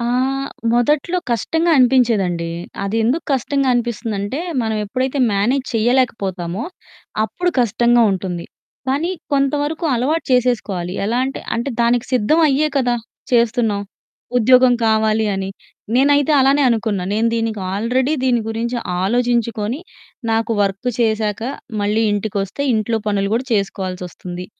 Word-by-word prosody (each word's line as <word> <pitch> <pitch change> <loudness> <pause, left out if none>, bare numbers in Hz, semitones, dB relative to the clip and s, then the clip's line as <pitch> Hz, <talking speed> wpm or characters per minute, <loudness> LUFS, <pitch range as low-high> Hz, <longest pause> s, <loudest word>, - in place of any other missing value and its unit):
ఆ! 235 - -2 0.7
మొదట్లో 300 +8 +2
కష్టంగా 325 +9 +1
అనిపించేదండి. 220 -10 +2 0.3
అది 200 +3 -2
ఎందుకు 280 +8 0
కష్టంగా 275 +1 0
అనిపిస్తుందంటే, 230 0 -2 0.2
మనం 220 -1 -1
ఎప్పుడైతే 255 +6 -2
మ్యానేజ్ 245 +7 +1
చేయలేకపోతామో, 220 -5 0 0.6
అప్పుడు 355 +10 -1
కష్టంగా 240 +1 +3
ఉంటుంది. 180 -2 -4 0.4
కానీ, 290 +7 0 0.2
కొంతవరకు 290 +4 0
అలవాటు 285 +7 0
చేసేసుకోవాలి. 215 -8 0
ఎలా 235 +3 0
అంటే, 270 +1 -4 0.2
అంటే 240 +4 -2
దానికి 240 +1 +2
సిద్ధం 255 +7 +3
అయ్యే 290 +2 +2
కదా 245 -2 +1 0.4
చేస్తున్నాం? 230 -3 +2 0.6
ఉద్యోగం 250 +1 +5
కావాలి 220 0 +2
అని. 195 0 -3 0.5
నేనైతే 285 +3 +4
అలానే 275 +2 +4
అనుకున్నా. 220 -5 0
నేను 220 +2 +1
దీనికి 225 -2 -1
ఆల్రెడీ 250 +7 0
దీని 245 -2 +2
గురించి 230 +2 -2 0.3
ఆలోచించుకొని, 235 - 0 0.5
నాకు 225 +1 +1
వర్కు 200 +5 -1
చేశాక 220 -2 0 0.4
మళ్ళీ 210 +2 +1
ఇంటికొస్తే, 205 +3 -2
ఇంట్లో 220 +1 0
పనులు 200 -1 0
గూడా 240 +3 0
చేసుకోవాల్సొస్తుంది. 180 -2 -4
235 Hz, 115 wpm, -19 LUFS, 205-260 Hz, 0.7 s, ఉద్యోగం